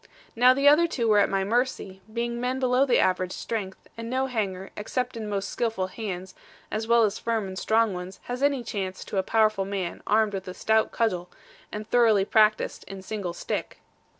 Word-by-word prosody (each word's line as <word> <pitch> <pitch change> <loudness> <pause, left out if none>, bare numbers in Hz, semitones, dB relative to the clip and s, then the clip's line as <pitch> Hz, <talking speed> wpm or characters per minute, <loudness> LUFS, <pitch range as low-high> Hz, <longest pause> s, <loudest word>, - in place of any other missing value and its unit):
Now 250 +2 +6
the 275 +1 +2
other 310 +4 +6
two 240 -8 -1
were 210 -1 +5
at 200 - +3
my 195 0 0
mercy, 215 -3 -1
being 235 +1 -2
men 255 +1 -1
below 255 +1 +2
the 245 - +4
average 185 0 +1
strength; 195 -5 -5
and 230 0 -6
no 260 +2 0
hanger, 195 -7 -3
except 250 +4 -3
in 220 -2 -5
most 200 -1 -2
skilful 225 -5 -1
hands, 190 -2 -6 0.4
as 220 +1 -2
well 235 0 +5
as 215 -1 0
firm 225 -3 -1
and 190 - -7
strong 220 +2 +2
ones, 180 +1 -7
has 245 +1 -5
any 280 -3 +2
chance 190 -4 -4
to 195 - -2
a - - +3
powerful 215 -1 +2
man 190 -3 -4
armed 215 0 +3
with 190 -1 -5
a 185 - -6
stout 220 +3 +2
cudgel, 180 -6 -1 0.4
and 210 0 -6
thoroughly 225 -5 +4
practised 215 0 +2
in 195 0 -8
single 195 -4 -4
stick. - - -4
215 Hz, 200 wpm, -26 LUFS, 190-235 Hz, 0.4 s, Now